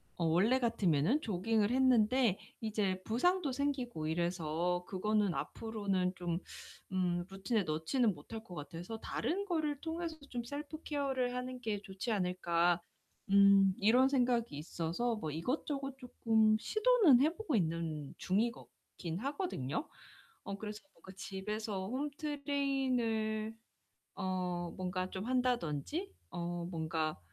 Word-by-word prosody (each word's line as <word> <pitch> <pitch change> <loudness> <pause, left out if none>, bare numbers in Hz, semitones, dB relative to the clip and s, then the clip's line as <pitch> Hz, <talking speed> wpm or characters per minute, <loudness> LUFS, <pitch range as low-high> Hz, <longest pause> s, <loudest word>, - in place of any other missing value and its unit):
어 170 - -1
원래 195 +11 +4
같으면은 200 - +2
조깅을 215 +2 +1
했는데 250 -4 +4 0.2
이제 205 -4 0
부상도 310 +7 +2
생기고 255 - -2
이래서 175 +1 0
그거는 205 0 +1
앞으로는 200 -5 -1
좀 175 -2 -2 0.5
음 175 -2 0
루틴에 195 +2 0
넣지는 180 - +1
못할 220 +9 -8
것 180 - -11
같아서 170 +8 -6
'다른 395 - -2
거를 310 -6 -1
통해서 330 0 -3
좀 240 -1 -3
셀프케어를 285 -2 -2
하는 255 0 -4
게 215 -4 -2
좋지 195 +4 -4
않을까.' 175 -3 +2 0.5
음 200 -1 +7
이런 245 +6 +5
생각이 245 - +2
있어서 170 +9 -1
뭐 160 -8 -4
이것저것 275 - -2
쪼끔 225 -4 +3
시도는 430 - +5
해 310 +4 +3
보고 425 - -1
있는 160 -5 -1
중이거 220 +6 0 0.3
긴 170 -2 -3
하거든요. 275 - -2 0.6
어 200 - -5
그래서 210 +1 -6
뭔가 190 +3 -13
집에서 200 0 -4
홈 265 +7 -2
트레이닝을 260 -7 0 0.6
어 180 -2 -2
뭔가 185 0 -2
좀 190 +1 -4
한다든지 250 - 0 0.2
어 175 -1 -3
뭔가 160 -2 -1
215 Hz, 270 characters per minute, -34 LUFS, 180-255 Hz, 0.6 s, 음